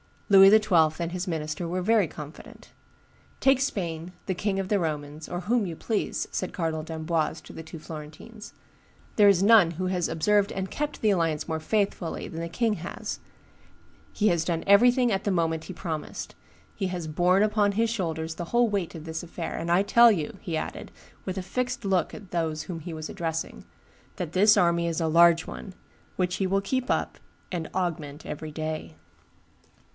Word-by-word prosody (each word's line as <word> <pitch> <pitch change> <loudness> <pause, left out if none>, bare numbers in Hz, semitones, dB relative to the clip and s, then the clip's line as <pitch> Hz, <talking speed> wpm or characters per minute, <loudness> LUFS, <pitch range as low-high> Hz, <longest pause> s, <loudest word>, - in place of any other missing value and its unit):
Louis 195 -1 +9
XII. 180 -7 +4
and 170 -1 -3
his 180 +1 -4
minister 160 0 -3
were 180 +2 -2
very 210 -1 +3
confident. 150 0 -11 0.7
"Take 270 -1 +4
Spain, 180 - -3
the 190 - +1
king 195 +1 -1
of 190 0 -3
the 205 - +2
Romans, 150 -2 -4
or 175 - -4
whom 225 +3 +1
you 165 - -5
please," 215 +5 -2
said 185 - -3
Cardinal 160 -3 -2
d'Amboise 160 0 -2
to - - -13
the - - -7
two 160 +1 -9
Florentines; 155 +8 -10 0.6
"there 205 -2 +7
is 195 -2 +5
none 205 -5 +6
who 185 +3 -3
has 180 -2 0
observed 205 +5 +2
and 190 0 -4
kept 295 0 -3
the 215 - +3
alliance 165 -5 0
more 160 0 -1
faithfully 200 -1 -1
than 165 - -6
the 170 - -3
king 225 +3 0
has; 175 -1 -6 0.9
he 215 0 +2
has 170 -2 +1
done 170 -2 -1
everything 245 +4 +5
at 195 -1 -1
the 205 - +1
moment 165 -3 0
he 185 - -7
promised; 165 -4 -5 0.4
he 195 - -2
has 180 -3 -4
borne 180 +5 +3
upon 210 -1 +2
his 225 +2 +1
shoulders 160 -7 -3
the 175 - -5
whole 235 +5 +2
weight 195 -5 -2
of 160 - -8
this 160 0 -5
affair; 170 -1 -5
and 170 - -4
I 175 +3 +4
tell 235 +3 +7
you," 170 -2 -2
he 170 -5 -3
added, - - -5 0.3
with 185 0 -4
a 190 - -3
fixed 250 +5 -3
look 190 -2 +1
at 200 -4 -11
those 160 -3 -1
whom 175 -4 -6
he 165 +2 -7
was 155 -1 -6
addressing, 165 -3 -4 0.5
"that 175 -4 -5
his 210 +3 +6
army 170 -2 +3
is 165 0 -1
a 165 - +1
large 165 +1 +5
one, 190 -3 -8 0.4
which 180 -1 -1
he 190 - 0
will 195 +1 +1
keep 255 +5 -2
up - - -1 0.3
and 170 -3 -3
augment 155 -5 -3
every 155 +1 -6
day." 155 - -5
175 Hz, 190 wpm, -26 LUFS, 160-200 Hz, 0.9 s, Louis